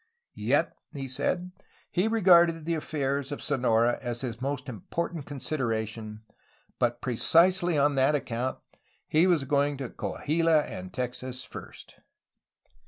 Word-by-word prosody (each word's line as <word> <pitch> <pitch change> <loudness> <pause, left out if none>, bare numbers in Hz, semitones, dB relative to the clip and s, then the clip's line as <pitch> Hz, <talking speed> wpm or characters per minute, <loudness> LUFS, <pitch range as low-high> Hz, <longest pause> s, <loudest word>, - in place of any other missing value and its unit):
Yet, - - +1 0.2
he 135 -3 -5
said, 175 +8 -2 0.4
he 185 +5 +2
regarded 175 -7 +5
the 170 - 0
affairs 140 -3 -2
of 145 - -4
Sonora 120 -4 +2
as 120 -2 -4
his 120 -2 -5
most 140 0 -3
important 145 - -4
con 145 - -6
sideration, 110 -6 -3 0.6
but 120 0 +1
precisely 170 +7 +3
on 145 +1 +3
that 135 +2 +3
account 125 -2 -2 0.5
he 160 +4 +4
was 170 -6 +3
going 140 +1 +1
to 130 -3 -5
Coahuila 160 0 +1
and 90 -7 -7
Texas 125 +1 -4
first! - - -11
140 Hz, 130 wpm, -28 LUFS, 125-165 Hz, 0.6 s, regarded